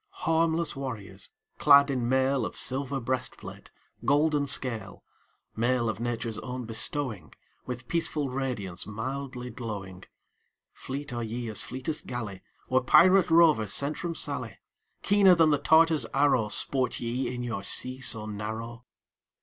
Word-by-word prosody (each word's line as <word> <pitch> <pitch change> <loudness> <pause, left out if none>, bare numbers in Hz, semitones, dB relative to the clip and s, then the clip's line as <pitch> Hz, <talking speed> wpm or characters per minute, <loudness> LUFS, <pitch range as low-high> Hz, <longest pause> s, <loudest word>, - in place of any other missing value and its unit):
Harmless 165 0 +1
warriors, 105 -8 -7 0.3
clad 140 -1 +6
in 125 -3 -1
mail 130 0 +2
Of - - -5
silver 135 +1 0
breastplate, 130 +1 -5 0.3
golden 145 0 +2
scale; 115 -7 -3 0.5
Mail 120 0 +1
of 110 -2 -4
Nature's 115 -2 -3
own 125 -1 -6
bestowing, 115 -1 -2 0.3
With 125 -1 -6
peaceful 160 -4 -1
radiance, 125 -9 -4
mildly 125 +3 -5
glowing 100 -6 -7 0.7
Fleet 140 0 -6
are 120 - -3
ye 115 +1 -4
as 105 - +1
fleetest 150 +5 -4
galley 110 -6 -5 0.3
Or 130 0 +2
pirate 185 +8 +5
rover 160 -9 +5
sent 140 +9 0
from 170 -1 -4
Sallee; 125 -10 -4 0.5
Keener 195 -2 +5
than 165 -2 +4
the 145 - +2
Tartar's 160 0 +4
arrow, 135 -6 +3
Sport 130 +4 +2
ye 120 +3 -2
in 125 -1 -5
your 115 -5 -4
sea 130 +6 0
so 110 -4 +1
narrow. 110 +3 -6
130 Hz, 135 wpm, -27 LUFS, 115-145 Hz, 0.7 s, clad